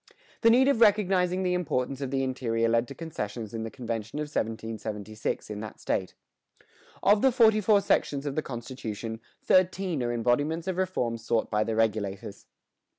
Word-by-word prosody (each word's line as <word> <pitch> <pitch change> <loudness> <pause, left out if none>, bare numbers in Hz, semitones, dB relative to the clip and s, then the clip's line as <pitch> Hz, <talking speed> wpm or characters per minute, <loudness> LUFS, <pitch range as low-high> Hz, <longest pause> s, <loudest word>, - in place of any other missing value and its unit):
The 230 - +6
need 255 +3 +5
of 275 -5 +2
recognizing 190 -4 +3
the 180 -1 +1
importance 140 -6 -1
of 135 - -2
the 135 0 0
interior 115 -3 0
led 115 +1 +2
to 140 - -9
concessions 110 -9 -5
in 115 - -3
the 115 - -4
convention 115 0 -5
of 150 - -1
1776 110 -6 -4
in 105 - -5
that 110 -1 -8
state. 95 - -2 0.9
"Of 205 +1 +5
the 265 - +5
forty 220 -3 +5
four 205 0 +4
sections 145 -7 0
of 145 - -2
the 155 - 0
constitution, 115 -4 -6 0.2
thirteen 185 -4 +2
are 120 0 -1
embodiments 145 +8 0
of 185 -1 -2
reforms 125 -12 -1
sought 115 -1 0
by 105 0 +2
the 110 0 -2
Regulators." 105 -3 -2
130 Hz, 170 wpm, -28 LUFS, 115-180 Hz, 0.9 s, The